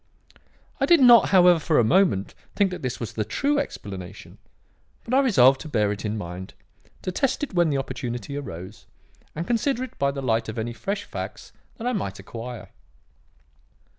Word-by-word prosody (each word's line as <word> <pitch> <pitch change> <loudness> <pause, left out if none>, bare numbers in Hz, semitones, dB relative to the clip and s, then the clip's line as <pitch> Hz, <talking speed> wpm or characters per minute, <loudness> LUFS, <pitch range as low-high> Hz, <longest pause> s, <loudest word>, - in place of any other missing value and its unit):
"I - - +2
did 345 -2 +6
not, 240 -3 +7
however, 180 -3 +6
for 155 0 +1
a - - +5
moment, 155 - +2 0.2
think 200 -2 +2
that 180 - -6
this 125 -2 -4
was 115 - -5
the 110 - -1
true 280 - 0
explanation, 95 - -7 0.6
but 240 - -5
I 265 - +5
resolved 135 - +5
to 155 - -8
bear 105 -6 +1
it 105 - -5
in 105 0 -2
mind, 90 -1 -7 0.5
to 185 - -2
test 270 - -1
it 290 - -4
when 175 -2 +3
the 140 - 0
opportunity 125 -1 -5
arose, 100 -6 -8 0.5
and 165 +3 -3
consider 245 +3 0
it 260 - -9
by 140 - +2
the 140 -1 -4
light 115 -2 0
of 110 - -6
any 115 +1 -3
fresh 195 - -3
facts - - -7 0.3
that 230 - -7
I 250 - 0
might 100 - -3
acquire. 120 0 -8
140 Hz, 185 wpm, -24 LUFS, -, 0.6 s, not